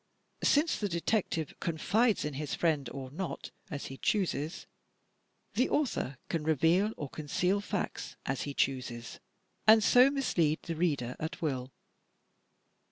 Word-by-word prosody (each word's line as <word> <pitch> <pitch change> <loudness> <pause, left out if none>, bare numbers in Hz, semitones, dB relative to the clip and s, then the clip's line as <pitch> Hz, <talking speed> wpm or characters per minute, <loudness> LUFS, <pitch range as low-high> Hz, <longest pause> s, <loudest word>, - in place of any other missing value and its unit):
Since 300 +3 +3
the 205 - -1
detective 170 -3 0
confides 205 +7 +1
in 150 - -3
his 145 +1 -3
friend 150 -7 +1
or 130 -2 -7
not, 175 +4 -5 0.2
as 145 -2 -5
he 135 - -7
chooses, 170 -5 -1 0.9
the 250 - +2
author 225 - 0
can 165 -3 -2
reveal 165 +7 +3
or 145 - -4
con 150 +2 -8
ceal 185 +7 +1
facts 205 -1 -3
as 135 - -1
he 140 -1 -4
chooses, 125 -3 -2 0.5
and 220 0 +8
so 250 +5 +7
mislead 175 - +1
the 165 - -4
reader 145 -7 0
at 160 +4 -4
will. 135 -6 -2
160 Hz, 140 wpm, -31 LUFS, 140-205 Hz, 0.9 s, and